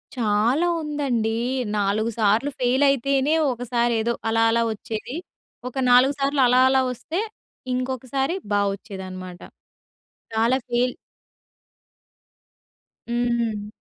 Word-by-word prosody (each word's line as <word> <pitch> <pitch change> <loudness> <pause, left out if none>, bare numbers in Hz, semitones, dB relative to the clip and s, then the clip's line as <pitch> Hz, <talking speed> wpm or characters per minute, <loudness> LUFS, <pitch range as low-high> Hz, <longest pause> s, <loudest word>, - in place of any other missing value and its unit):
చాలా 235 +8 +2
ఉందండి. 280 -7 -1 0.5
నాలుగు 205 +2 +1
సార్లు 220 +6 +3
ఫెయిల్ 255 +2 +2
అయితేనే 275 +2 +1 0.2
ఒకసారి 240 -1 0
ఏదో 235 +2 0 0.2
అలా 225 0 +2
అలా 230 +1 +2
వచ్చేది. 220 +4 -6 0.5
ఒక 250 - -8 0.2
నాలుగు 255 +3 +6
సార్లు 275 0 +1
అలా 250 +1 +4
అలా 265 0 +4
వస్తే 315 +8 -4 0.5
ఇంకొకసారి 260 +4 -2 0.2
బావొచ్చేది 200 -1 -2
అన్నమాట. 185 -1 -8 0.9
చాలా 230 +3 +2
ఫీల్ 245 +1 +1 2.2
హ్మ్. 235 -3 -1
240 Hz, 100 wpm, -23 LUFS, 220-265 Hz, 2.2 s, నాలుగు